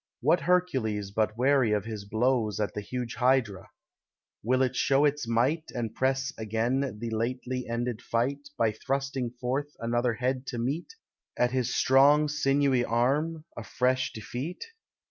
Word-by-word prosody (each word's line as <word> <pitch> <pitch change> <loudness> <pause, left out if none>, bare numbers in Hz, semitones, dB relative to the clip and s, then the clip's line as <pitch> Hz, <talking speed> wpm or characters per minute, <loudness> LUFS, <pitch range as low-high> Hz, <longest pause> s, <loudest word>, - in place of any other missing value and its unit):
What - - +3
Hercules 130 - 0
but 110 +1 0
wearies 130 -4 +3
of 105 - -2
his 110 -3 -6
blows 110 -1 0
At 105 - -1
the 105 - -4
huge 120 +2 -4
Hydra? 125 -6 +1 0.7
will 130 +4 +2
it 130 0 -1
show 140 +3 +3
its 145 -4 0
might, 130 +8 +1
And 115 -3 -3
press 135 +2 0
again 115 +3 -1
the 115 +1 -5
lately 125 +3 -2
ended 115 -1 -2
fight, 140 +5 -2
By 115 -1 +2
thrusting 135 +2 -2
forth 130 +4 -3
another 120 0 0
head 130 +2 -2
to 120 - -4
meet, 140 - -3 0.4
At 125 0 +2
his 125 -1 -1
strong 145 +3 +5
sinewy 140 -3 +2
arm, 145 +8 0
a 115 - -6
fresh 130 +3 0
defeat? 125 - -6
125 Hz, 150 wpm, -28 LUFS, 115-135 Hz, 0.7 s, strong